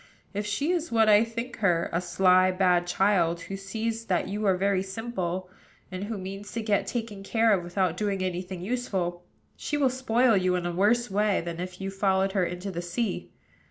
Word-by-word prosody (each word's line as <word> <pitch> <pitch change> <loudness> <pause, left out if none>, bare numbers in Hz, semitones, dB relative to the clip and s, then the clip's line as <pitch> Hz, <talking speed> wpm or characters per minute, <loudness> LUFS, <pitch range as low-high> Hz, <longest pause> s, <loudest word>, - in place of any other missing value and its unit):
If 205 +1 -3
she 280 +11 0
is 340 -5 -1
what 225 -1 +4
I 210 +1 +7
think 230 +2 -5
her, 175 -5 +2
a 170 - +1
sly, 185 +1 +4
bad 180 -1 +2
child, 175 -2 +2
who 195 - -6
sees 220 +4 -3
that 180 -4 0
you 205 +1 -2
are 190 -1 +3
very 195 0 +1
simple, 190 -3 -4 0.4
and 185 +2 -4
who 220 0 -4
means 195 +2 -7
to 230 - -3
get 210 -2 +1
taken 225 -4 -4
care 225 +2 +3
of 185 -3 +1
without 175 -1 -1
doing 200 -2 -1
any 180 -1 -1
thing 185 -1 -7
useful, 190 -6 -2 0.3
she 295 - -3
will 270 -3 +3
spoil 250 -2 +2
you 185 -1 +2
in 180 -1 -2
a 175 - -1
worse 210 +6 +2
way 205 0 +2
than 170 0 -6
if 180 0 -6
you 195 0 -4
followed 195 0 +1
her 190 -2 +1
into 180 +3 -4
the 175 -1 -4
sea. 180 +4 -3
195 Hz, 205 wpm, -27 LUFS, 180-220 Hz, 0.4 s, I